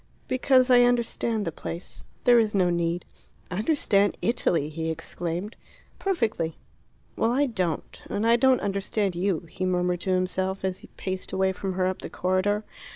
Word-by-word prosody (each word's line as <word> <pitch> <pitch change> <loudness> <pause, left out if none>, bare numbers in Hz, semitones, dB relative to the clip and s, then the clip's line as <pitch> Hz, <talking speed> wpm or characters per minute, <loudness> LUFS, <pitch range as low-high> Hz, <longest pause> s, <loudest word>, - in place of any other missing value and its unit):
"Because 255 0 +3
I 245 -1 +8
understand 235 -3 +1
the 165 - -2
place. 170 +2 -7 0.2
There 245 -1 +6
is 215 -2 +1
no 180 -2 +3
need." 170 0 -1 0.5
"Understand 205 - +2
Italy!" 175 -9 +1
he 160 +1 -3
exclaimed. 170 +5 -4 0.4
"Perfectly." 225 - -1 0.6
"Well, 225 - +1
I 275 +4 +3
don't. 185 - -3
And 210 - -1
I 230 +1 +6
don't 260 +1 +4
understand 200 -1 -1
you," 180 -1 0
he 180 +2 -7
murmured 180 -1 0
to 190 - -3
himself, 185 +1 0
as 185 -1 -2
he - - -14
paced 185 -1 -4
away 190 0 +2
from 190 0 -4
her 185 0 0
up 185 0 -2
the - - -6
corridor. 190 +3 0
190 Hz, 160 wpm, -26 LUFS, 180-230 Hz, 0.6 s, I